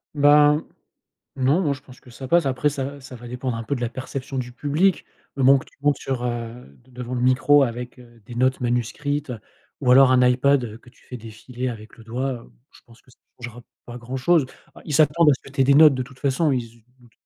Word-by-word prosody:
Bah, 145 Hz, 0 st, +5 dB, 0.8 s
non, 135 Hz, +6 st, +2 dB
moi, 150 Hz, -6 st, 0 dB
je 135 Hz, -, -14 dB
pense 130 Hz, -2 st, -17 dB
que -, -, -20 dB
ça 125 Hz, +2 st, -9 dB
passe. 170 Hz, +2 st, +2 dB
Après 135 Hz, +3 st, 0 dB
ça 140 Hz, 0 st, -5 dB
ça 130 Hz, 0 st, -11 dB
va 120 Hz, 0 st, -11 dB
dépendre 125 Hz, -1 st, -4 dB
un -, -, -5 dB
peu 115 Hz, +5 st, -3 dB
de 125 Hz, -, -6 dB
la 120 Hz, -, -2 dB
perception 130 Hz, +2 st, -6 dB
du 125 Hz, -1 st, -5 dB
public. 150 Hz, +9 st, 0 dB, 0.3 s
Le 135 Hz, -, -1 dB
moment 135 Hz, +1 st, +6 dB
que -, -, -11 dB
tu -, -, -23 dB
montes 145 Hz, -1 st, +2 dB
sur, 130 Hz, -2 st, -4 dB
heu, 120 Hz, -, -6 dB
devant 125 Hz, -1 st, -8 dB
le 125 Hz, -, -2 dB
micro 130 Hz, +3 st, +4 dB
avec, 125 Hz, 0 st, -4 dB
heu, 120 Hz, -2 st, -18 dB
des 120 Hz, -, -10 dB
notes 130 Hz, +2 st, +1 dB
manuscrites 130 Hz, +4 st, -2 dB, 0.5 s
ou 125 Hz, -, +2 dB
alors 130 Hz, +1 st, +7 dB
un 125 Hz, -1 st, +4 dB
iPad, 130 Hz, +1 st, +2 dB
heu, 110 Hz, -1 st, -8 dB
que 125 Hz, -, -20 dB
tu 125 Hz, -, -23 dB
fais 125 Hz, -, -9 dB
défiler 115 Hz, +3 st, -7 dB
avec 110 Hz, -2 st, -9 dB
le 115 Hz, -, -14 dB
doigt, 125 Hz, +4 st, -3 dB
heu, 120 Hz, -2 st, -10 dB, 0.2 s
je -, -, -19 dB
pense 115 Hz, 0 st, -20 dB
que -, -, -24 dB
ça -, -, -25 dB, 0.2 s
changera 120 Hz, 0 st, -9 dB, 0.2 s
pas 120 Hz, 0 st, -9 dB
grand 125 Hz, +2 st, -7 dB
chose. 145 Hz, +2 st, +2 dB, 0.3 s
Ah, -, -, -14 dB
ils 150 Hz, -, -4 dB
s'attendent 155 Hz, +2 st, +4 dB
à 145 Hz, -, +6 dB
ce -, -, -13 dB
que 135 Hz, -, -12 dB
tu 140 Hz, -, -2 dB
aies -, -, +5 dB
des 140 Hz, +1 st, +4 dB
notes, 150 Hz, 0 st, +7 dB
de 130 Hz, -, -2 dB
toute 130 Hz, +1 st, -14 dB
façon. 140 Hz, +2 st, 0 dB
Ils 125 Hz, -2 st, 0 dB
se 115 Hz, 0 st, -15 dB, 0.2 s
doutent 120 Hz, -2 st, -23 dB
130 Hz, 250 wpm, -22 LUFS, 120-140 Hz, 0.8 s, alors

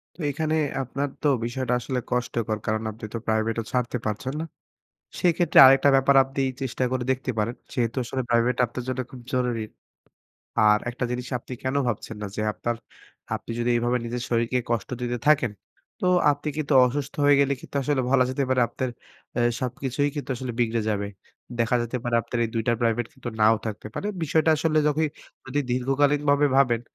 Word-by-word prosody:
তো -, -, -27 dB
এখানে 155 Hz, +2 st, -1 dB, 0.3 s
আপনার 135 Hz, +2 st, -2 dB
তো -, -, +2 dB, 0.2 s
বিষয়টা 125 Hz, +1 st, -2 dB
আসলে 125 Hz, +1 st, -2 dB
কষ্টকর। 115 Hz, -3 st, -1 dB
কারণ 110 Hz, 0 st, 0 dB
আপনি 110 Hz, +1 st, -9 dB
তো -, -, -1 dB
প্রাইভেটও 110 Hz, +1 st, 0 dB
ছাড়তে 125 Hz, -1 st, 0 dB
পারছেন 110 Hz, +5 st, -2 dB
না। 160 Hz, -, -3 dB, 0.8 s
সেক্ষেত্রে 175 Hz, -1 st, +3 dB
আরেকটা 135 Hz, +2 st, +6 dB
ব্যাপার 135 Hz, +1 st, +4 dB
আপনি 135 Hz, +1 st, -5 dB, 0.2 s
চেষ্টা 130 Hz, 0 st, -1 dB
করে 130 Hz, -1 st, -1 dB
দেখতে 130 Hz, 0 st, -1 dB
পারেন। 115 Hz, +3 st, 0 dB, 0.2 s
যেহেতু 120 Hz, 0 st, -1 dB
আসলে 130 Hz, +2 st, -3 dB
প্রাইভেট 120 Hz, +1 st, +3 dB
আপনার 120 Hz, +2 st, -6 dB
জন্য 130 Hz, 0 st, -1 dB
খুব 130 Hz, -, -10 dB
জরুরি। 125 Hz, -3 st, 0 dB, 1.0 s
আর 105 Hz, 0 st, +5 dB
একটা 125 Hz, +1 st, -4 dB
জিনিস 125 Hz, 0 st, -3 dB
আপনি 120 Hz, -, -12 dB
কেন 130 Hz, +1 st, -1 dB
ভাবছেন 110 Hz, -1 st, -4 dB
না -, -, -2 dB
যে, -, -, -2 dB
আপনার 120 Hz, +2 st, -3 dB, 0.6 s
আপনি -, -, -11 dB
যদি 120 Hz, +1 st, 0 dB
এভাবে 120 Hz, +1 st, +1 dB
নিজের 120 Hz, +1 st, -3 dB
শরীরকে 120 Hz, +1 st, +1 dB
কষ্ট 115 Hz, -4 st, -1 dB
দিতে 120 Hz, 0 st, -2 dB
থাকেন। 135 Hz, -7 st, +4 dB, 0.5 s
তো -, -, +2 dB, 0.2 s
আপনি 145 Hz, +1 st, -2 dB
কিন্তু 155 Hz, -1 st, -1 dB
অসুস্থ 140 Hz, +2 st, -3 dB
হয়ে 145 Hz, 0 st, +6 dB
গেলে 140 Hz, 0 st, +3 dB
কিন্তু -, -, -8 dB
আসলে 140 Hz, 0 st, +1 dB
বলা 130 Hz, -1 st, +5 dB
যেতে 135 Hz, +2 st, 0 dB
পারে 130 Hz, -1 st, +2 dB
আপনার 130 Hz, -1 st, -3 dB, 0.4 s
অ্যাঁ 120 Hz, 0 st, +2 dB
সবকিছুই 135 Hz, +3 st, -1 dB
কিন্তু 145 Hz, -2 st, -5 dB
আসলে 125 Hz, 0 st, -4 dB
বিগড়ে 115 Hz, -1 st, +1 dB
যাবে। 100 Hz, -1 st, -1 dB, 0.5 s
দেখা 115 Hz, +1 st, +2 dB
যেতে 120 Hz, +2 st, -3 dB
পারে 120 Hz, -1 st, -1 dB
আপনার 120 Hz, -, -4 dB
এই -, -, -2 dB
২ 115 Hz, -, 0 dB
টা -, -, +5 dB
প্রাইভেট 115 Hz, 0 st, +1 dB
কিন্তু -, -, -8 dB
নাও 110 Hz, +1 st, +6 dB
থাকতে 105 Hz, -1 st, -5 dB
পারে। -, -, -3 dB, 0.2 s
বিষয়টা 160 Hz, +1 st, +2 dB
আসলে 155 Hz, +1 st, +1 dB, 0.7 s
যদি 135 Hz, +2 st, -1 dB
দীর্ঘকালীনভাবে 140 Hz, +3 st, +2 dB
ভাবেন 125 Hz, -4 st, +4 dB
125 Hz, 180 wpm, -25 LUFS, 115-140 Hz, 1.0 s, আরেকটা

